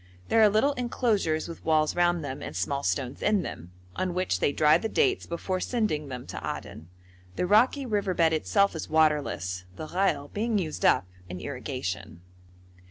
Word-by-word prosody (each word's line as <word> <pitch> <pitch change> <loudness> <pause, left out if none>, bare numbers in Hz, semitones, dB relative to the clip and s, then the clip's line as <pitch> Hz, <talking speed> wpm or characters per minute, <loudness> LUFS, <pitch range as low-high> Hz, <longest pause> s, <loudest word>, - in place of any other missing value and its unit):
There 225 - +4
are 215 - +7
little 220 +8 +2
enclosures 220 - 0
with 170 - -9
walls 155 -1 +2
round 175 -1 +2
them, 135 -1 -5
and - - -7
small 140 +11 -1
stones 135 -2 -2
in 210 -3 +2
them, 85 +2 -8 0.2
on 185 -1 -2
which 185 0 0
they - - +2
dry 150 +1 +4
the 220 - -3
dates 395 - +1
before 185 +2 -2
sending 195 - -1
them 125 -2 -7
to - - -8
Aden. 80 +2 -6 0.5
The - - 0
rocky 245 +8 +3
river 205 -5 -1
bed 165 -1 +3
itself 200 +5 +2
is 160 - -5
waterless, 150 - +1
the 155 - -7
ghail 160 -7 0
being 220 +1 0
used 160 -6 -2
up - - +4 0.2
in 90 +1 -6
irrigation. 95 - -5
165 Hz, 175 wpm, -27 LUFS, 140-205 Hz, 0.5 s, are